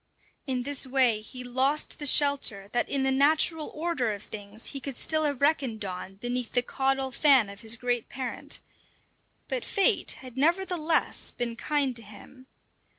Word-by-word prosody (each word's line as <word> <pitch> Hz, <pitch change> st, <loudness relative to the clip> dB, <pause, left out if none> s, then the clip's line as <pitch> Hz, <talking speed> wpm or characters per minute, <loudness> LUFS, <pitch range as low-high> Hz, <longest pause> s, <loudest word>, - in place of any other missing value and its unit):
In 255 Hz, -2 st, -1 dB
this 280 Hz, 0 st, +1 dB
way 250 Hz, -5 st, +3 dB
he 250 Hz, +4 st, -8 dB
lost 265 Hz, +4 st, +1 dB
the 290 Hz, -, +2 dB
shelter 275 Hz, -9 st, +2 dB
that 240 Hz, -, 0 dB
in 275 Hz, -1 st, 0 dB
the 265 Hz, -, +2 dB
natural 305 Hz, +3 st, +3 dB
order 305 Hz, -8 st, -1 dB
of 205 Hz, 0 st, -7 dB
things 205 Hz, +1 st, -7 dB
he 275 Hz, -, -5 dB
could 270 Hz, -1 st, -6 dB
still 310 Hz, -1 st, +2 dB
have 285 Hz, -3 st, -2 dB
reckoned 265 Hz, -8 st, +1 dB
on 185 Hz, +1 st, -6 dB
beneath 245 Hz, +3 st, -3 dB
the 245 Hz, -, +3 dB
caudal 270 Hz, +1 st, 0 dB
fan 260 Hz, -5 st, +4 dB
of 200 Hz, -, -11 dB
his 225 Hz, +1 st, 0 dB
great 245 Hz, -1 st, -2 dB
parent; 255 Hz, -2 st, -3 dB, 0.9 s
but -, -, -2 dB
fate 395 Hz, -, +3 dB
had 255 Hz, -1 st, -12 dB
nevertheless 335 Hz, +1 st, +1 dB
been 235 Hz, -1 st, -4 dB
kind 275 Hz, 0 st, 0 dB
to -, -, -7 dB
him. 225 Hz, +5 st, -14 dB
260 Hz, 165 wpm, -27 LUFS, 235-285 Hz, 0.9 s, fan